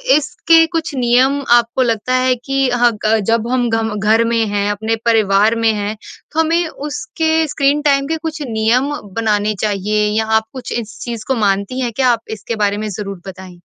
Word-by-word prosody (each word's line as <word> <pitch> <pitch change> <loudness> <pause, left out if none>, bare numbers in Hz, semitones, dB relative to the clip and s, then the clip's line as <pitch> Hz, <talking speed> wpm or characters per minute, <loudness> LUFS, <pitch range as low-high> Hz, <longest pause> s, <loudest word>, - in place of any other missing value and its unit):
इसके 325 +2 +3
कुछ 325 -3 -3
नियम 255 +3 +2
आपको 240 +2 +3
लगता 230 +1 -1
है 255 0 +3
कि 270 -1 +1
हाँ 245 -1 +3
ग 220 0 +3
जब 230 0 +1
हम 245 -2 +1
घ 225 0 0
घर 215 +3 +3
में 230 -1 +2
हैं 205 0 -1
अपने 220 +2 -2
परिवार 215 -1 +3
में 225 -1 +2
हैं 205 0 -3 0.4
तो 315 - -2
हमें 330 +1 +2
उसके 320 +2 -2
स्क्रीन 285 +1 +1
टाइम 275 -2 +2
के 320 +1 -1
कुछ 315 -1 -5
नियम 230 +5 +1 0.2
बनाने 215 -2 0
चाहिए? 210 0 0
या 220 - +1
आप 220 0 +2
कुछ 260 - -7
इस 220 -1 -9
चीज़ 235 -3 -6
को 265 - +1
मानती 200 +3 0
हैं 240 - -1
क्या? 260 +2 +2
आप 235 -2 +2 0.2
इसके 210 +3 -5
बारे 205 -1 0
में 215 0 -4
ज़रूर 200 -2 -6
बताएँ। 185 -2 -10
230 Hz, 190 wpm, -17 LUFS, 215-270 Hz, 0.4 s, इसके